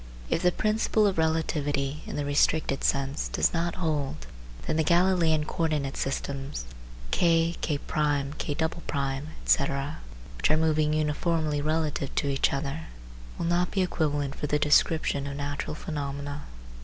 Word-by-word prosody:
If - - +2
the 180 - +4
principle 215 +2 +2
of 195 -4 +1
relativity 150 -3 0
(in - - -5
the 145 - -1
restricted 145 0 +2
sense) 140 +1 0
does - - +1
not 170 0 -1
hold, 145 - -2 0.4
then - - 0
the 160 - +3
Galileian 170 -2 +3
co - - -8
ordinate 145 -4 -1
systems 135 - -3 0.5
K, 165 0 +3
K1, 145 -1 0
K2, 145 -3 -2 0.2
etc., 140 - +1 0.4
which - - +1
are 155 - +4
moving 155 -1 +2
uniformly 155 0 0
relative 155 -2 -1
to 145 - +1
each 135 -1 +2
other, 140 +3 -3 0.5
will - - -2
not 175 +1 +2
be 190 - +1
equivalent 145 -5 -1
for 150 - -4
the 150 - +2
description 150 -1 +3
of 140 - -4
natural 145 +1 -3
phenomena. 145 -2 -4
150 Hz, 145 wpm, -27 LUFS, 140-160 Hz, 0.5 s, the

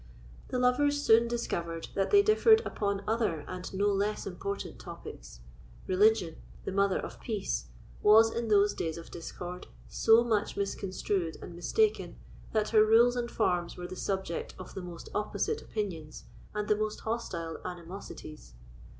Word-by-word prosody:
The 255 - -2
lovers 285 +4 +3
soon 230 -4 +5
discovered 170 -8 -3
that 195 - 0
they 405 0 +6
differed 440 +1 +5
upon 200 -1 -2
other 215 -8 0
and 185 0 -6
no 195 +1 0
less 205 +1 0
important 195 +2 -5
topics. - - -10 0.4
Religion, 185 -3 +3 0.3
the - - -2
mother 200 0 +2
of - - -6
peace, 210 -5 -3 0.3
was, 225 +2 +6
in 235 0 -2
those 205 -1 +4
days 160 -1 -3
of 165 - -10
discord, 175 +1 -7 0.2
so 225 - +5
much 215 -4 0
misconstrued 195 -3 -2
and 175 - -9
mistaken, 425 - +1 0.4
that 215 -1 +1
her 215 -1 +6
rules 230 +3 +5
and 240 -1 -2
forms 180 -7 0
were 180 - -6
the 185 - -7
subject 190 -3 -3
of 185 - -9
the 190 - -5
most 175 -2 -9
opposite 430 - -1
opinions 170 -8 -5 0.3
and 210 0 -2
the 210 - +4
most 215 0 -3
hostile 180 -8 -3
animosities. 170 - -9
200 Hz, 150 wpm, -30 LUFS, 180-225 Hz, 0.4 s, they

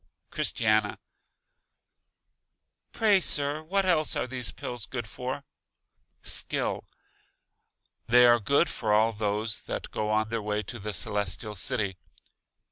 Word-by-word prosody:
Christiana: 110 -1 +1 1.9
Pray, 210 -3 +4
Sir, 145 -1 +2
what 195 +5 0
else 155 -5 +2
are - - -1
these 125 -7 0
Pills 120 +5 -4
good 120 -3 -4
for? 125 +5 -5 0.8
Skill: - - -1 1.2
They 125 +1 +7
are 120 0 +6
good 140 - +3
for 110 -3 -2
all 110 +2 +4
those 105 +1 -1
that - - -5
go 105 0 -2
on 110 0 +1
their 115 -1 -2
way 105 0 -2
to 120 - -7
The 105 +1 -4
Celestial 100 +1 -1
City. 105 -2 -1
115 Hz, 125 wpm, -28 LUFS, 105-130 Hz, 1.9 s, They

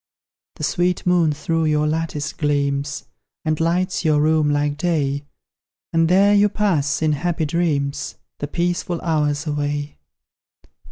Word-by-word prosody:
The - - -8
sweet 180 -1 0
moon 175 -3 +3
through 160 +2 -1
your 150 -1 +2
lattice 155 -2 -2
gleams, 145 -1 -1 0.4
And 155 -1 0
lights 180 +3 0
your 155 -3 +3
room 155 0 +3
like 145 0 +1
day; 145 -4 -1 0.7
And 165 0 +3
there 200 +3 +5
you 205 0 +5
pass, 165 -9 0
in 155 - +3
happy 160 +2 -1
dreams, 145 -3 -1 0.2
The 145 - -3
peaceful 175 +2 -1
hours 150 -2 0
away! 145 -1 -2
155 Hz, 130 wpm, -21 LUFS, 145-175 Hz, 0.7 s, there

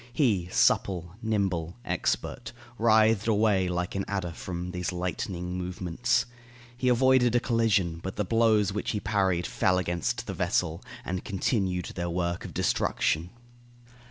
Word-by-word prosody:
He, 110 - +1
supple, 90 -2 +2
nimble, 95 -6 -1
expert, - - -2 0.3
writhed 110 -1 +4
away 105 -4 +3
like 90 0 -2
an 95 - -1
adder 95 -4 -2
from 85 +1 -5
all 90 - -5
these 90 0 -3
lightning 90 0 -3
movements. 90 +8 0 0.5
He 125 +1 -2
avoided 125 -1 +4
a - - +5
collision, 110 -9 +1
but 95 +2 -5
the 105 - -1
blows 110 -2 +3
which 105 - -3
he 105 - -1
parried 95 -5 +1
fell 95 -1 +1
against 85 -2 -1
the - - -4
vessel, 80 +1 -1 0.2
and 90 +1 -3
continued 95 -3 -1
their 85 -1 -3
work 85 0 -2
of - - -8
destruction. 80 +3 0
95 Hz, 145 wpm, -28 LUFS, 90-110 Hz, 0.5 s, a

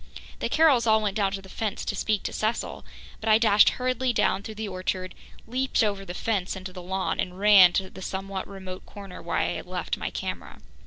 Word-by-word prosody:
The - - -2
Carrolls 285 -8 +4
all 220 0 +5
went 210 -2 -2
down 200 -3 +1
to 195 -1 -5
the - - -12
fence 210 +2 -3
to 205 - -2
speak 210 0 0
to - - -4
Cecil, 220 +2 -2 0.4
but 220 - -2
I 215 - +7
dashed 215 -2 +6
hurriedly 255 0 0
down 195 -3 +2
through 215 +1 -8
the 220 0 -4
orchard, 185 -1 -3 0.3
leaped 255 +1 0
over 200 -2 -1
the 175 -1 -7
fence 200 -4 -1
into 185 -1 -7
the 180 - -8
lawn 190 +1 -2
and 180 0 -2
ran 200 -3 +8
to 190 - 0
the 190 - -12
somewhat 190 0 -4
remote 190 -2 -8
corner 200 -2 -10
where - - -2
I - - +1
had - - -5
left - - -3
my - - -3
camera. - - -6
200 Hz, 220 wpm, -26 LUFS, 190-220 Hz, 0.4 s, ran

